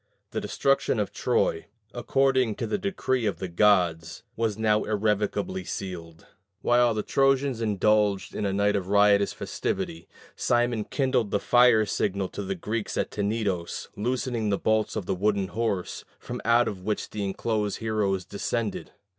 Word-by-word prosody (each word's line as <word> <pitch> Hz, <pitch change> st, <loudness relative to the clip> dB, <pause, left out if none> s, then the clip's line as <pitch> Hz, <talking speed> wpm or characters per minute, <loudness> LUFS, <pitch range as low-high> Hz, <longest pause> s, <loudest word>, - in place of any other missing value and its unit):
The -, -, -2 dB
destruction 135 Hz, -4 st, +1 dB
of 105 Hz, -, -2 dB
Troy, 80 Hz, -, 0 dB, 0.3 s
according 130 Hz, -1 st, +1 dB
to -, -, -3 dB
the 210 Hz, -, -2 dB
decree 130 Hz, -, -1 dB
of 105 Hz, -, -1 dB
the 95 Hz, -, -4 dB
gods, 85 Hz, -3 st, +2 dB
was 110 Hz, -2 st, -1 dB
now 110 Hz, -1 st, +2 dB
irrevocably 105 Hz, -, -1 dB
sealed. 85 Hz, -4 st, -7 dB, 0.4 s
While 120 Hz, -1 st, +3 dB
the 105 Hz, -, -1 dB
Trojans 135 Hz, -2 st, +2 dB
indulged 105 Hz, -1 st, +1 dB
in -, -, -3 dB
a 100 Hz, -, 0 dB
night 100 Hz, +1 st, +2 dB
of 95 Hz, -2 st, -2 dB
riotous 100 Hz, 0 st, +4 dB
festivity, 85 Hz, +1 st, -4 dB, 0.3 s
Simon 120 Hz, -3 st, +1 dB
kindled 130 Hz, -6 st, 0 dB
the 100 Hz, -, 0 dB
fire 120 Hz, -2 st, +5 dB
signal 100 Hz, -2 st, -1 dB
to -, -, -6 dB
the 95 Hz, 0 st, -3 dB
Greeks 105 Hz, +4 st, -3 dB
at -, -, -1 dB
Tenedos, 100 Hz, -4 st, -2 dB
loosening 120 Hz, 0 st, -1 dB
the 100 Hz, -, +1 dB
bolts 110 Hz, +1 st, 0 dB
of 105 Hz, -4 st, -3 dB
the -, -, -1 dB
wooden 100 Hz, 0 st, 0 dB
horse, 105 Hz, -5 st, -2 dB
from -, -, -7 dB
out 120 Hz, +1 st, +4 dB
of 95 Hz, -3 st, -4 dB
which 105 Hz, +2 st, -3 dB
the 105 Hz, -, -3 dB
enclosed 105 Hz, +1 st, -1 dB
heroes 105 Hz, -4 st, -1 dB
descended. 110 Hz, +2 st, -3 dB
105 Hz, 155 wpm, -26 LUFS, 100-115 Hz, 0.4 s, fire